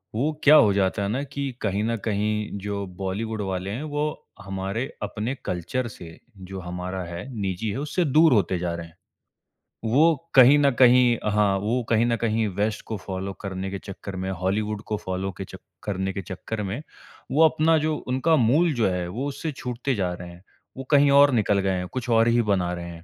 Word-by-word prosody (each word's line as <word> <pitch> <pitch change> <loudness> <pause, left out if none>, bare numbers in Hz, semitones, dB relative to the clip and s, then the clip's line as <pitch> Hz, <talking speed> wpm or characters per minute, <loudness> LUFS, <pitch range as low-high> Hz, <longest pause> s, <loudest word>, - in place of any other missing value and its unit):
वो 140 +8 +1
क्या 150 +1 +8
हो 105 -8 +6
जाता 100 +1 +1
है - - 0
ना 130 +6 -1
कि 140 -1 -4
कहीं 100 -1 0
न 115 +1 0
कहीं 105 0 -1
जो 100 0 -3
बॉलीवुड 105 +3 -3
वाले 95 0 -3
हैं, 125 +8 -4
वो 150 0 -3
हमारे 95 +5 -3 0.2
अपने 115 +5 -3
कल्चर 120 +8 -2
से 85 -6 -11 0.2
जो 95 0 -8
हमारा 90 +1 -5
है, 85 +6 -7
निजी 95 +3 -2
है, 100 - -3
उससे 150 +4 -1
दूर 155 +1 +5
होते 95 -4 +2
जा 85 -1 -2
रहे 85 -1 -7
हैं। 80 - -21 1.0
वो 160 +5 +5 0.2
कहीं 130 +2 +8
न 140 -1 +4
कहीं 125 -1 +6
हाँ, 105 -2 +2
वो 115 +5 -1
कहीं 115 0 +3
न 120 - +2
कहीं 110 -1 0
वेस्ट 105 +1 -1
को 110 - -4
फॉलो 95 0 -5
करने 95 -1 -4
के 100 - -4
चक्कर 100 0 -8
में, 95 +1 -3
हॉलीवुड 105 +4 -2
को 105 - +1
फॉलो 95 +1 -2
के - - -4
चक्क 95 - -12 0.2
करने 95 -1 -2
के 100 - -4
चक्कर 100 +4 -5
में, 100 +9 -4 0.5
वो 155 +4 +4
अपना 160 +1 +3
जो 155 0 0
उनका 130 +6 +2
मूल 150 +6 +3
जो 115 -5 +1
है, 90 -1 -2
वो 120 +11 -4
उससे 145 +3 -4
छूटते 125 0 -3
जा 90 -3 -1
रहे 90 0 -8
हैं, 85 +2 -14 0.3
वो 135 - -5
कहीं 145 -1 +5
और 145 -1 +6
निकल 105 -3 +2
गए 95 -1 0
हैं, 90 0 -3
कुछ 125 +2 -5
और 115 0 +4
ही 120 0 +4
बना 95 -5 0
रहे 85 -1 -5
हैं। 85 -1 -10
105 Hz, 210 wpm, -24 LUFS, 95-130 Hz, 1.0 s, क्या